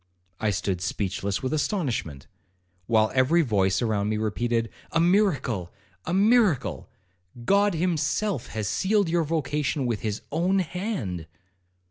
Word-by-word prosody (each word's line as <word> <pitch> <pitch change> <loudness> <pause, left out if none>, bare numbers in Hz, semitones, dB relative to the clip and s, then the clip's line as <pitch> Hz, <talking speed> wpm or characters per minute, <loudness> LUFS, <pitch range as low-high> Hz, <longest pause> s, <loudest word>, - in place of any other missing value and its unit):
I 110 - +1
stood 95 -2 -1
speechless 100 +2 -2
with 130 - -1
astonishment, 135 - -2 0.6
while 110 -2 +3
every 135 +7 +4
voice 100 -4 +1
around 105 -2 0
me 110 - 0
repeated, 115 +2 -1 0.2
'A 165 - +3
miracle! 160 - +1 0.3
a - - -3
miracle!—God 170 - +1
himself 165 - 0
has 110 -2 -4
sealed 200 - +1
your 170 0 +2
vocation 150 -2 -1
with 115 -4 -1
his 105 -1 -3
own 175 +6 +1
hand.' 175 - -3
130 Hz, 120 wpm, -26 LUFS, 105-175 Hz, 0.6 s, every